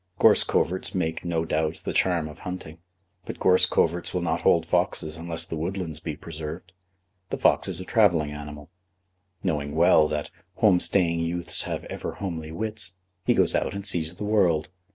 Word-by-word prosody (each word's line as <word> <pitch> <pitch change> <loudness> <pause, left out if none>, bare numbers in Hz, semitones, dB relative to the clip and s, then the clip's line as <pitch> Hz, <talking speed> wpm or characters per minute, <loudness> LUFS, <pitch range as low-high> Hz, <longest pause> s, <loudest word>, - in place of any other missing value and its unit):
Gorse - - +5
coverts 95 +2 -1
make, 80 -3 -2
no 85 -2 -1
doubt, 80 0 -2
the - - -3
charm 85 -4 +1
of 75 - -11
hunting, 90 -3 -7 0.5
but - - -6
gorse 90 0 +4
coverts 85 +2 0
will 90 - 0
not 85 +1 -1
hold 85 -2 +3
foxes 75 -1 0
unless 85 0 -2
the - - -5
woodlands 80 -1 -4
be 80 -3 -5
preserved. 80 +3 -8 0.6
The - - -3
fox - - +3
is 95 -3 -1
a 90 - -6
travelling 85 -10 +3
animal. 75 +1 -9 0.7
Knowing 75 -1 -2
well 80 -2 +5
that 75 -1 -4 0.2
"home 100 -5 +4
staying 85 -3 +4
youths 85 +1 +1
have - - -3
ever - - -6
homely 80 -5 -5
wits," 105 +1 -3 0.3
he - - +4
goes - - +3
out - - -1
and 100 0 -5
sees 85 -4 0
the 105 - -6
world. 90 -7 +2
85 Hz, 175 wpm, -25 LUFS, 80-90 Hz, 0.7 s, Gorse